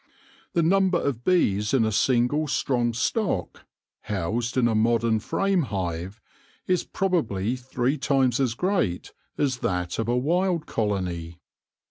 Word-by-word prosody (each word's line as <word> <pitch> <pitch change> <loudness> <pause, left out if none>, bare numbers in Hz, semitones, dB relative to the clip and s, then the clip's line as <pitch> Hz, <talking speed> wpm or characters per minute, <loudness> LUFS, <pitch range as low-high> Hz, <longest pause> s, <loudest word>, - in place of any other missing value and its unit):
The 170 - +2
number 185 +1 +3
of 125 -4 -2
bees 105 - +2
in 115 -4 +3
a 110 - 0
single 125 +7 +2
strong 120 -3 0
stock, 125 - -2 0.4
housed 110 +6 -2
in 120 -2 +4
a 115 - +1
modern 115 0 +2
frame 195 - 0
hive, 95 - -4 0.5
is 180 -1 +1
probably 125 - -1
three 130 +2 -2
times 135 -3 +2
as 125 -4 +1
great 180 - -1 0.2
as 135 -3 0
that 90 0 -2
of 115 - -1
a 120 +1 +1
wild 170 +5 +1
colony. 90 -6 -2
120 Hz, 135 wpm, -25 LUFS, 105-155 Hz, 0.5 s, in